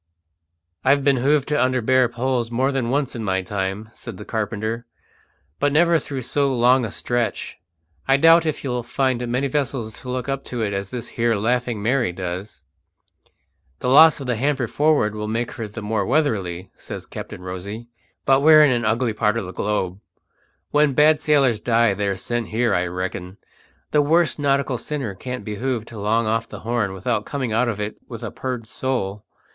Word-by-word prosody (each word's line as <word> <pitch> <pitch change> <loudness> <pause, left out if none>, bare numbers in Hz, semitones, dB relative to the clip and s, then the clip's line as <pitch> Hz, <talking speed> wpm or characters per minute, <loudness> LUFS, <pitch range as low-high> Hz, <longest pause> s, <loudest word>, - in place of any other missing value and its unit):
"I've 140 +1 +3
been 140 -1 +3
hove 140 +3 +2
to 150 -2 +1
under 130 0 +1
bare 130 +1 +3
poles 120 -1 -1
more 130 +4 +1
than 130 -4 -1
once 135 0 -1
in 115 - -4
my 95 -2 0
time," 95 +2 -3
said - - -9
the - - -9
carpenter, 110 +1 -3 0.7
"but 145 0 +2
never 165 +2 +4
through 135 -2 -5
so 140 +3 +1
long 125 +1 +4
a 110 - -3
stretch. 120 +1 -2 0.5
I 135 0 +5
doubt 165 +2 +6
if 155 - -2
you'll 125 -3 -2
find 125 0 -1
many 125 +4 0
vessels 130 -6 -2
to 130 - -9
look 125 +1 -3
up 135 0 -2
to 120 -2 -3
it 100 -2 -1
as 100 0 -3
this 120 0 -5
here 115 -1 +1
Laughing 120 0 -1
Mary 120 -4 +1
does." 90 +3 -6 1.1
"The 125 - -2
loss 155 +4 +7
of 135 - -6
hamper 130 +2 0
forward 145 -4 +2
will 105 0 -4
make 115 +2 -2
her 115 -4 -5
the 105 +1 -8
more 105 -1 0
weatherly," 100 - -1
says - - -8
Captain 90 - -8
Rosy. 100 +5 -6 0.4
"But 135 0 +4
we're 155 0 +8
in 140 - +3
an 120 -2 0
ugly 115 +1 +1
part 105 +1 +1
of 115 - -3
the 90 - -8
globe. 100 -3 -2 0.7
When 150 -1 +3
bad 150 +2 +4
sailors 135 -8 +3
die 115 -2 +3
they're 100 -1 -1
sent 120 0 -3
here, 120 +2 +1
I 90 0 +1
reckon. 90 +1 -5 0.5
The 150 - +4
worst 165 +2 +2
nautical 140 -3 +1
sinner 140 -9 -4
can't 125 +6 -6
be 105 -2 -4
hove 125 -2 -2
to 115 -2 -10
long 110 +3 +1
off 115 +1 -1
the - - -9
Horn 115 -4 -1
without 105 +3 -1
coming 130 -4 -3
out 120 +3 +2
of 105 -3 -4
it 105 +1 -4
with - - -8
a - - -4
purged 125 -3 -4
soul. 105 -6 -3
120 Hz, 190 wpm, -22 LUFS, 105-135 Hz, 1.1 s, we're